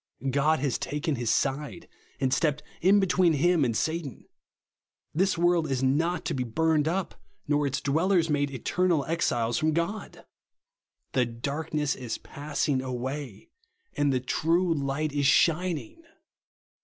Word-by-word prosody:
God 145 +4 +3
has 140 -4 0
taken 150 +2 -2
his 120 -3 -2
side, 145 +7 -1 0.3
and 130 -1 +1
stepped 150 +2 +1 0.2
in 195 +4 +5
between 180 -3 +3
him 170 +2 +3
and 115 -4 0
Satan. 160 -5 -3 0.9
This 190 +4 +2
u^orld 170 -2 +2
is 135 -1 -1
not 165 +7 +1
to 170 - -1
be 130 -3 -1
burned 155 +5 +1
up, 185 +3 -1 0.3
nor 145 0 +2
its 140 +1 -1
dwellers 165 +5 +2
made 145 -2 +1
eternal 160 +4 0
exiles 120 -8 0
from 155 0 +1
God 185 +6 -2
1 - - -17 0.9
The 130 -2 +2
darkness 145 +5 -2
is 125 -3 -5
passing 145 -2 -2
away, 130 - -5 0.4
and 145 -1 +2
the 130 - +1
true 165 +7 +1
light 145 +1 -2
is 145 -2 +2
shining 165 - +1
150 Hz, 145 wpm, -27 LUFS, 135-170 Hz, 0.9 s, in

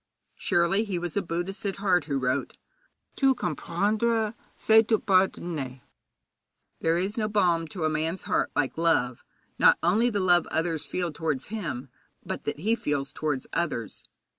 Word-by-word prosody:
Surely 175 +5 +2
he 200 -5 -3
was 175 -1 -4
a 200 - +2
Buddhist 175 +3 -4
at 195 -2 -2
heart 185 -5 +2
who 140 -3 -1
wrote: 130 +1 -1 0.6
'Tout 270 -1 +3
comprendre, 210 +7 0 0.2
c'est 220 0 +5
tout 220 -1 +1
pardonner.' 170 - +1 1.0
There 165 +1 +2
is 195 +5 -2
no 215 - +1
balm 175 -6 +2
to 165 +2 -6
a - - +4
man's 160 +4 -2
heart - - 0
like 145 +2 0
love, 130 -8 +1 0.4
not - - +6
only 210 +8 +3
the 205 -4 -1
love 175 -3 +3
others 160 -2 -1
feel 175 -3 -2
towards 150 -3 -2
him, 145 - -4 0.4
but - - -5
that 150 - -3
he 220 +5 +2
feels 145 -10 -2
towards 150 -4 -2
others. 120 - -2
175 Hz, 160 wpm, -27 LUFS, 150-200 Hz, 1.0 s, not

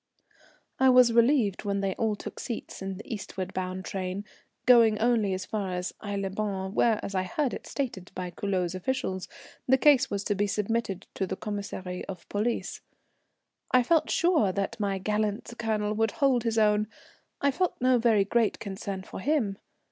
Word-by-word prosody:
I 265 0 +6
was 250 -2 +6
relieved 235 -4 +3
when 200 -1 -1
they 195 -1 0
all 220 +1 0
took - - -8
seats 230 -4 -6
in 195 -1 -4
the 210 - -10
eastward 195 -3 -5
bound 185 0 -3
train, 190 +1 -4 0.4
going 230 -3 +6
only 225 -3 +2
as 185 - -5
far 200 -4 -3
as 180 +1 -3
Aix 205 -1 -2
les 195 -1 -2
Bains, 195 -1 -3
where, 225 -1 +3
as 200 - -4
I 185 - +1
heard 245 +9 -1
it - - -7
stated 240 -10 -4
by 180 -1 -4
the - - -29
Culoz 185 -3 -1
officials, 190 -2 -2 0.4
the 265 +1 +5
case 270 -1 +5
was 200 -1 -2
to 205 - 0
be 205 +1 0
submitted 210 -1 -1
to 190 - -2
the 190 - -3
Commissary 200 -3 -5
of 185 - -8
Police. 215 +4 -2 0.9
I 250 -1 +4
felt 315 +4 +2
sure 330 - +3
that 200 +4 -3
my 200 -2 0
gallant 210 +3 -1
Colonel 215 -2 0
would 220 0 +1
hold 260 -4 +2
his 225 -1 0
own, 210 -1 +3 0.5
I 280 - +3
felt 360 +6 -1
no 255 0 +4
very 225 -4 +4
great 230 +2 +1
concern 195 -2 -5
for - - -8
him. 230 -6 0
210 Hz, 185 wpm, -28 LUFS, 195-235 Hz, 0.9 s, I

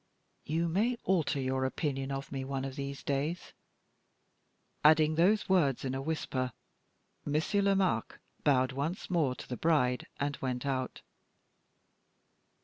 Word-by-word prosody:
"You 165 +3 0
may 220 +9 +1
alter 160 -6 +1
your 130 0 0
opinion 135 0 -2
of 135 0 -4
me 135 -1 -3
one 135 0 -3
of 135 -1 -5
these 140 -1 -5
days." 145 +5 -2 1.3
Adding 155 0 +6
those 190 +7 +3
words 150 -9 +2
in 130 - -1
a 135 - -2
whisper, 135 -4 -2 0.7
Monsieur 155 +7 +1
Lomaque 195 -1 +1 0.3
bowed 130 -3 +3
once 150 +9 -3
more 150 -8 +2
to - - -10
the 125 - -4
bride 135 -7 +2
and 145 0 -1
went 125 0 -2
out. 130 -2 -2
140 Hz, 135 wpm, -31 LUFS, 135-165 Hz, 1.3 s, Adding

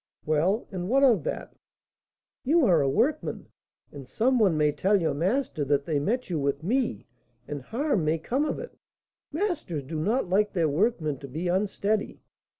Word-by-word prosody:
"Well, 165 +9 +1
and 180 -1 -4
what 270 +3 +3
of 230 - +5
that?" - - -4 0.9
"You 310 +2 +3
are 170 -8 +4
a 135 - +2
workman, 265 - -1 0.4
and 140 -3 -10
some 250 - +1
one 190 -8 +3
may 150 -1 +3
tell 195 +7 +2
your 165 - 0
master 185 - -1
that 140 0 +1
they 155 -3 0
met 240 - -1
you 170 -4 -2
with 140 +1 -1
me, 225 - -1 0.4
and 145 -1 -5
harm 230 - -1
may 155 +2 +1
come 250 - -1
of - - -2
it; - - -8 0.6
masters 305 - -2
do 155 +4 -5
not 215 +8 0
like 205 +3 +1
their 165 -5 +1
workmen 155 - 0
to 140 - -8
be 160 +7 -4
unsteady." 200 +3 -1
185 Hz, 175 wpm, -27 LUFS, 150-240 Hz, 0.9 s, of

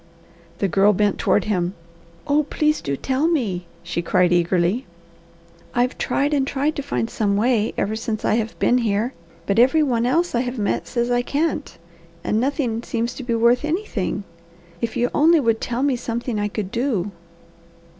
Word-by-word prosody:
The 200 - +1
Girl 195 +4 +4
bent 205 +1 +1
toward 205 - +2
him. 180 -3 -1 0.5
"Oh 290 +1 +3
please 305 +1 0
do 140 -1 -2
tell 270 - 0
me!" 205 - -1 0.2
she 170 0 -2
cried 180 +1 +2
eagerly. 175 +6 +1 0.9
"I've 245 +2 +1
tried 285 +2 0
and 275 -2 +1
tried 285 +3 0
to - - -1
find 275 -5 -2
some 205 -4 0
way 225 -1 +1
ever 215 +2 0
since 220 -1 -3
I - - +3
have 225 0 -1
been 250 - +3
here, 225 +2 0 0.3
but 200 +4 +1
every 265 +6 +5
one 240 -4 +1
else 335 +7 +1
I 240 - +2
have 250 0 -4
met 205 -2 -1
says 240 -1 -1
I 245 0 +3
can't, 300 +3 -2 0.5
and 215 - +1
nothing 250 -3 -1
seems 235 0 -2
to 265 - -7
be 240 -1 -1
worth 235 +3 +3
anything. 305 - -2 0.6
If 230 -2 -2
you 245 +1 +1
only 320 +2 +5
would 230 -4 +1
tell 245 +2 -2
me 280 -2 +2
something 235 -1 -3
I 205 - 0
could 205 -2 -4
do!" 230 -6 -1
235 Hz, 180 wpm, -22 LUFS, 205-270 Hz, 0.9 s, every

